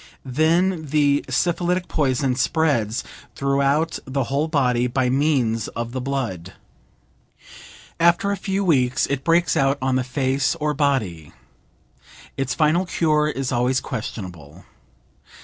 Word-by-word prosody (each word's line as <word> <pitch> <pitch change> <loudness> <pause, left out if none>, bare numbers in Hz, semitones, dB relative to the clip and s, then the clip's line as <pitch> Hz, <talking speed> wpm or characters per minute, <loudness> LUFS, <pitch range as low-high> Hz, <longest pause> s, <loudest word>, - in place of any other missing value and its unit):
Then 160 +5 +1
the 145 -1 +2
syphilitic 175 +1 0
poison 135 -2 0
spreads 130 -6 0 0.3
throughout 140 +3 +1
the 135 +1 -1
whole 140 +5 -1
body 125 -6 +1
by 125 0 0
means 130 -6 +1
of 115 +1 -5
the 130 +1 -4
blood. 120 -10 -4 1.5
After 170 +5 +3
a - - 0
few 195 +1 -2
weeks 130 -7 +2
it 140 -1 -3
breaks 170 -2 +2
out 135 +1 +2
on 130 0 0
the 130 - 0
face 135 +2 0
or 150 -2 -1
body. 125 - -1 1.0
Its 135 -2 -2
final 165 +4 +2
cure 155 -3 +1
is 135 -3 -3
always 125 +1 +1
questionable. 90 - -7
135 Hz, 125 wpm, -22 LUFS, 125-155 Hz, 1.5 s, After